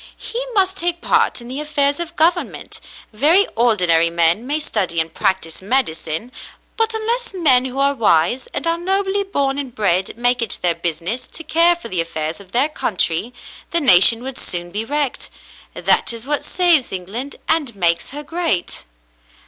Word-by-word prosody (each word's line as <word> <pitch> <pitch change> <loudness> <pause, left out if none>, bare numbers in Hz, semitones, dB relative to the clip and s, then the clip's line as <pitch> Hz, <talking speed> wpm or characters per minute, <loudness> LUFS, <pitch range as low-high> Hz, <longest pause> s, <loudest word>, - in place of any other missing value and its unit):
"He 485 +2 -5
must 380 -1 +3
take 345 0 -1
part - - +1
in 235 - -11
the 260 +3 -6
affairs 290 -1 0
of 345 0 -6
government. 345 +2 -1 0.3
Very 315 - +4
ordinary 180 -8 +3
men 170 +7 +2
may 295 +2 0
study 190 - -2
and 160 0 -2
practise 165 -3 -2
medicine, 195 -3 -1 0.4
but 450 0 0
unless 460 0 -2
men 265 -8 +5
who 260 0 -6
are 280 +1 +2
wise, 230 - +1
and - - -5
are 335 0 0
nobly 385 +2 0
born 280 -8 -1
and 265 -4 -7
bred, 190 -1 -1
make 245 +1 +1
it 230 - 0
their 175 -1 +2
business 170 +8 -3
to 330 - -8
care 335 +3 +4
for 345 - -9
the 185 -6 0
affairs 160 0 -4
of 195 -2 -16
their 260 +7 +2
country, 205 - -1 0.4
the 340 - +2
nation 230 - +6
w^ould 265 +1 -7
sooh 175 -1 -4
be 210 +4 -2
wrecked. 285 +1 -2 0.5
That - - +1
is 230 0 -8
what 295 +1 -2
saves 345 -7 +2
Eng 185 -1 -5
land 245 +9 -6
and 295 -8 +1
makes 170 -3 +1
her 295 +2 -7
great." 325 - -2
255 Hz, 175 wpm, -19 LUFS, -, 0.5 s, nation